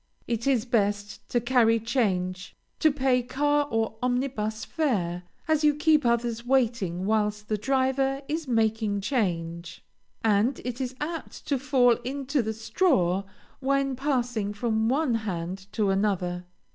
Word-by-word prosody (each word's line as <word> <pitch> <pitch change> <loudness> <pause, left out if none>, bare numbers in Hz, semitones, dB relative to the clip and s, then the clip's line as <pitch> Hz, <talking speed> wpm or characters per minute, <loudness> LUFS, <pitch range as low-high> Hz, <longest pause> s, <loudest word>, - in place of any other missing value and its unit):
It 235 +1 -2
is 255 -4 +2
best 205 -3 -1
to 240 - +2
carry 235 -2 +3
change 185 -6 -1 0.2
to 310 - +4
pay 265 -3 +2
car 290 +3 +1
or 225 -1 -1
omnibus 245 -4 -1
fare, 195 - -1 0.3
as 315 -1 +2
you 300 -1 +4
keep 300 -3 +3
others 235 -1 0
waiting 235 -8 +1
whilst 210 0 0
the 215 - +1
driver 270 +3 +1
is 315 0 -3
making 220 -3 +1
change, 170 -7 -2 0.4
and 220 +4 +2
it 250 +1 -3
is 255 0 -3
apt 320 +2 -5
to 280 -3 0
fall 250 -3 +4
into 275 +2 -2
the 220 -1 -3
straw 200 - +1 0.3
when 275 0 +1
passing 245 -6 -1
from 220 0 0
one 275 0 +1
hand 190 -3 -3
to 205 -3 +1
another. 185 -3 0
235 Hz, 140 wpm, -27 LUFS, 205-270 Hz, 0.4 s, to